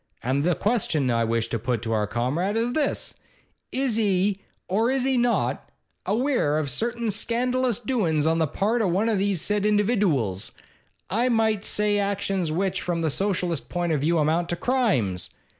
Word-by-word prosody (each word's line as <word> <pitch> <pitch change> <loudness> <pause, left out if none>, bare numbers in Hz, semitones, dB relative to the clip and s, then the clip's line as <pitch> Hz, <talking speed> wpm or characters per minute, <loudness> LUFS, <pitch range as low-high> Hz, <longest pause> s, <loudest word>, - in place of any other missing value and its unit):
And 135 +3 0
the 175 +1 +2
question 165 - 0
I 115 0 +2
wish 115 0 0
to 115 - -2
put 120 0 -2
to 115 - -3
our 105 -2 +1
Comrade 145 - -1
is 235 +2 0
this: 305 0 -1 0.5
Is 260 -4 0
he, 200 -2 +1 0.3
or 220 +6 +1
is 265 -1 +1
he 265 0 +1
not, 240 -1 0 0.4
aweer 230 - +1
of 145 -3 -2
certain 235 -1 -1
scandalous 245 +2 0
doin's 200 - 0
on 165 +1 +2
the 160 - +2
part 215 +10 0
of 200 - +1
one 200 +6 +1
of 215 -3 +1
these 195 -4 0
said 210 -1 0
individooals, 200 - +1 0.6
I 235 +6 +2
might 220 -3 +2
say 210 -1 +1
actions 195 -4 -1
which, 190 +3 -1
from 170 -1 -2
the 160 -2 0
Socialist 180 -3 -1
point 175 -1 -1
of 150 -3 +1
view, 165 +3 +2
amount 160 +3 +1
to 175 - 0
crimes? 170 - 0
195 Hz, 175 wpm, -25 LUFS, 155-225 Hz, 0.6 s, the